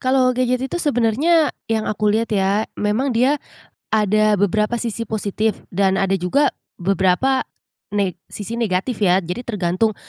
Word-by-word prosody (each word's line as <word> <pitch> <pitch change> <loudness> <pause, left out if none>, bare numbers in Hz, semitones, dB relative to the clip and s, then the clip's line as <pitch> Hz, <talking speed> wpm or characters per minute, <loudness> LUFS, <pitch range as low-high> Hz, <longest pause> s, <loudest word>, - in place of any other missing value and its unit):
kalau 255 -1 +3
gadget 255 +1 0
itu 350 +6 -3
sebenarnya 290 +4 +2 0.2
yang 220 -1 0
aku 210 0 0
lihat, 220 +2 0
ya, 200 +1 +1
memang 220 +6 0
dia 255 +5 +3 0.5
ada 215 0 +3
beberapa 210 +4 +1
sisi 230 -1 -4
positif, 215 0 -1 0.2
dan 190 0 +2
ada 195 0 +1
juga 195 +11 +1 0.2
beberapa 195 +8 +2 0.5
ne 200 -3 0 0.2
sisi 205 +2 -6
negatif, 210 +2 -1
ya. 185 -2 +4
Jadi, 180 +8 -4
tergantung, 210 -1 -1
215 Hz, 145 wpm, -20 LUFS, 195-245 Hz, 0.5 s, ya